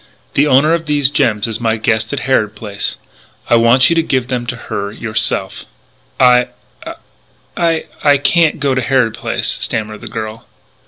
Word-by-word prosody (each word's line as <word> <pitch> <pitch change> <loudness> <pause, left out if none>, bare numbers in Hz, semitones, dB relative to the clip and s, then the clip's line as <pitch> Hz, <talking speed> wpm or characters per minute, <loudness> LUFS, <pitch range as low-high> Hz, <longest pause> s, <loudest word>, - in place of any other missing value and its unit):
The 145 +2 +3
owner 145 +4 +4
of 165 -1 -2
these 145 -2 +2
gems 105 -7 +1
is 110 -1 -4
my 115 -1 0
guest 110 0 0
at 140 - -3
Harrod 110 -5 0
Place. 100 -2 -5 0.5
I - - +7
want 115 +3 +5
you 170 - +1
to 165 - +3
give 130 -5 -1
them 125 -2 -3
to 120 - -3
her 100 -3 -5
yourself." 110 -3 -2 0.5
"I 125 -1 +5 1.1
I 160 -3 +1
can't 160 +1 +3
go 140 -2 +1
to 130 - 0
Harrod 125 -3 +1
Place," - - -3
stammered 110 -1 -4
the - - -7
girl. 110 0 -7
125 Hz, 165 wpm, -15 LUFS, 110-140 Hz, 1.1 s, I